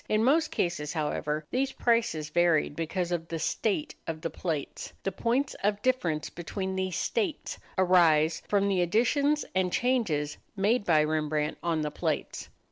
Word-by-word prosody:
In 215 +1 +2
most 300 +6 +3
cases, 160 -4 -2
however, 150 -1 -2
these 265 +1 0
prices 230 -11 +1
varied 170 -4 +2
because 175 +2 -2
of 165 -1 -2
the 165 - -3
"state" 225 - -1
of 160 -1 -4
the 165 - -3
plates. 155 -6 -4
The 195 - -1
points 240 +8 0
of 205 0 +1
difference 170 - 0
between 190 +3 -4
these 185 -1 -2
"states" 395 -10 -2 0.2
arise 170 -3 +4
from 200 -1 +2
the 190 -2 +2
additions 280 - +2
and 185 -1 +1
changes 190 - 0 0.2
made 205 +3 +1
by 155 -3 +4
Rembrandt 155 -1 -1
on 165 -2 0
the 150 -1 -2
plates. - - -3
180 Hz, 155 wpm, -28 LUFS, 155-225 Hz, 0.2 s, arise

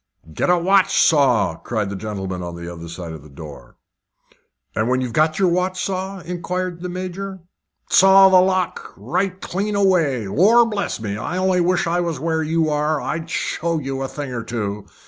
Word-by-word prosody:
"Get - - -1
a 180 - +5
watch 190 +2 +3
saw," 140 -7 +3
cried 105 -4 -3
the - - -4
gentleman 95 -3 -5
on 85 -1 -6
the 85 0 -8
other 85 0 -9
side 85 0 -7
the 75 - -15
door. 70 -4 -12 1.0
"And 110 +2 0
when 130 0 +2
you've 125 -3 -3
got 155 0 +2
your 190 -2 +3
watch 180 +1 0
saw?" 190 0 -4
inquired 180 0 -4
the 180 - -4
Major. 185 +1 -6 0.5
"Saw 195 0 +7
the 190 - +6
whole 180 +1 +5
lock 185 -2 -2
right 185 - -2
clean 205 +3 -2
away. 165 - +2
Lor' 210 - +5
bless 210 -4 -3
me! 105 -2 -4
I 135 +12 -4
only 185 -1 +2
wish 175 0 +1
I 170 +1 0
was 170 -5 -2
where 160 +1 -1
you 160 +1 +1
are, 150 +1 0
I'd 160 +3 -4
show 165 0 -1
you 135 -2 -4
a 135 - -2
thing 140 -2 -6
or 115 -2 -4
two. 105 -3 -4
165 Hz, 190 wpm, -21 LUFS, 110-185 Hz, 1.0 s, Saw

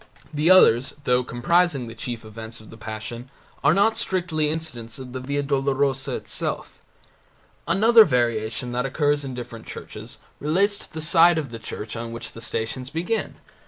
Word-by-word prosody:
The 150 +3 +2
others, 130 -9 +6
though 125 -1 +2
comprising 145 +3 +1
the 115 - -8
chief 115 0 -6
events 110 +1 -7
of 110 - -14
the - - -10
Passion, 110 +3 -7 0.3
are 145 - +6
not 205 +5 +3
strictly 170 -8 0
incidents 135 -7 -4
of 130 -2 -9
the 130 - -4
Via 140 +2 -2
Dolorosa 135 -1 0
itself. - - -3 0.9
Another 225 +3 +7
variation 120 - 0
that 125 +2 -1
occurs 145 +1 +1
in 130 -2 -5
different 120 -2 -8
churches - - -9 0.2
relates 195 +7 +1
to - - -13
the 160 - -6
side 170 +1 +5
of 150 -4 -2
the 115 - -7
church 110 0 -6
on 115 0 -5
which 115 0 -7
the 115 - -11
Stations 120 +3 -3
begin. 175 +8 -2
135 Hz, 165 wpm, -24 LUFS, 115-160 Hz, 0.9 s, Another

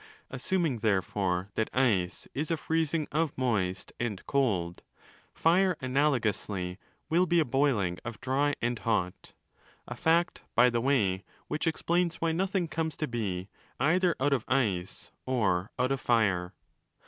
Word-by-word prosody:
Assuming, 170 - 0
therefore, 95 -2 0
that 110 - -1
ice 100 -9 +1
is 150 +4 -2
a 165 - +1
freezing 160 -1 0
of 155 0 0
moist 105 -8 -1
and 110 -6 -3
cold, 95 -11 0 0.5
fire 180 +1 +3
analogously 110 -9 0 0.3
will 175 +3 +3
be 175 0 +3
a 160 - +3
boiling 120 -9 +1
of 120 -4 -6
dry 140 +3 +1
and 120 -1 0
hot: 95 -6 -2 0.5
a - - -5
fact, 170 +2 +1
by 125 +1 +6
the 120 0 0
way, 105 -8 +1 0.2
which 155 - -2
explains 170 +1 +1
why 165 0 0
nothing 185 +1 0
comes 160 -1 -3
to 155 - -2
be 100 -6 -3 0.3
either 175 +5 +3
out 140 +2 +2
of 125 -5 0
ice 100 -9 -1 0.2
or 100 -7 +1
out 125 +2 +1
of 135 - -1
fire. 100 -7 +1
130 Hz, 145 wpm, -29 LUFS, 100-160 Hz, 0.5 s, by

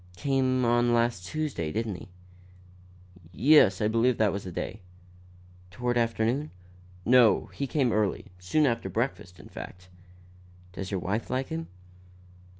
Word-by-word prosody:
"Came 130 0 +1
on 120 0 +3
last 115 -6 0
Tuesday, 145 - -3
didn't 110 +1 -2
he?" 90 +1 -10 1.2
"Yes, 110 - +5
I 105 - +2
believe 115 +3 +2
that 105 -2 +3
was 100 - -4
the 90 - -6
day." 105 +4 -5 0.9
"Toward 120 +6 -2
afternoon?" 115 +5 0 0.6
"No; 120 -2 +4
he 140 - -3
came 130 -4 +1
early; 105 -3 0
soon 145 +13 +1
after 115 -7 -1
breakfast, 95 -4 -3
in - - -12
fact." 90 0 -10 0.8
"Does 95 0 -6
your 95 - -2
wife 105 +6 -2
like 130 +1 -2
him?" 165 0 -4
115 Hz, 140 wpm, -27 LUFS, 100-130 Hz, 1.2 s, Yes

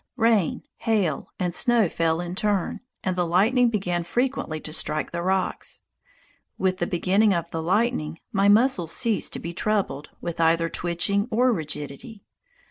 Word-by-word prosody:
Rain, 225 -7 +2
hail, 200 - 0
and 180 -1 -1
snow 235 -1 +3
fell 165 0 0
in 175 0 -5
turn, 200 -1 -1 0.2
and 185 -1 -1
the 180 - +1
lightning 220 +9 +3
began 180 -6 -1
frequently 240 - -1
to 155 - -8
strike 155 -1 -2
the 170 - -3
rocks. 190 +1 -2 0.8
With 185 0 0
the - - 0
beginning 190 +3 +2
of 170 0 -3
the 165 - -3
lightning 175 -3 0
my 200 -2 +3
muscles 205 -6 +3
ceased 230 -4 +2
to - - -4
be 170 +1 -6
troubled 195 -7 -1
with 170 -1 -5
either 165 0 +3
twitching 180 +6 0
or 250 +2 +3
rigidity. 155 - -5
185 Hz, 155 wpm, -24 LUFS, 165-215 Hz, 0.8 s, snow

